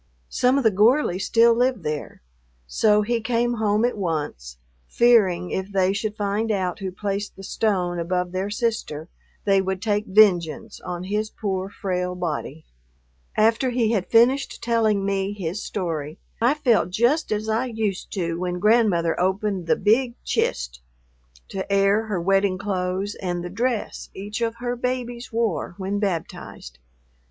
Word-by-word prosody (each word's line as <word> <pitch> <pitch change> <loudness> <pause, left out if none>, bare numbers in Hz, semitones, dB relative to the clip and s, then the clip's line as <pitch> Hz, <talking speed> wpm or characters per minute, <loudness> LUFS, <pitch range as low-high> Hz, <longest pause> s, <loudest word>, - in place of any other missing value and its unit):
Some 255 +2 +2
of 275 - +1
the 220 - +5
Gorleys 205 -2 +2
still 230 0 +5
live 245 -4 +1
there, 150 - -5 0.4
so 210 - +3
he 230 +2 -1
came 240 +1 0
home 210 +1 +2
at 245 - 0
once, 150 - -3 0.3
fearing 195 - +3
if 190 +1 -3
they 190 -1 +2
should 210 +1 -3
find 210 +2 -1
out 185 -4 -1
who 190 -2 -4
placed 200 +2 -4
the 195 - -11
stone 185 -4 0
above 180 +1 -1
their 190 +2 -2
sister 205 -8 -2 0.4
they 195 -1 +4
would 190 0 -2
take 210 +1 -1
vengeance 185 -6 +3
on 175 0 -5
his 210 +3 -2
poor, 190 -3 -3
frail 180 -2 -3
body. 160 -3 -4 0.7
After 225 +4 +3
he 235 -3 +1
had 200 -5 0
finished 250 +4 +3
telling 220 -4 +2
me 195 0 -1
his 190 0 -4
story, 160 -5 -4 0.2
I 245 +5 +4
felt 235 - +2
just 240 - +1
as 215 +1 -1
I 225 +4 0
used 220 -5 -3
to 170 -3 -2
when 180 0 -2
Grandmother 205 -5 +3
opened 190 0 0
the - - +4
"big 235 +3 +2
chist" - - -1 0.7
to 195 +1 -5
air 200 +2 +3
her 205 -4 -1
wedding 195 +1 +2
clothes 190 0 -2
and 175 -2 -2
the 175 - -6
dress 235 +2 -2
each 210 +4 -5
of 230 -1 0
her 245 +1 -3
babies 245 -1 -3
wore 225 -7 -1
when 200 +1 -2
baptized. 165 - -4
200 Hz, 155 wpm, -23 LUFS, 180-225 Hz, 0.7 s, the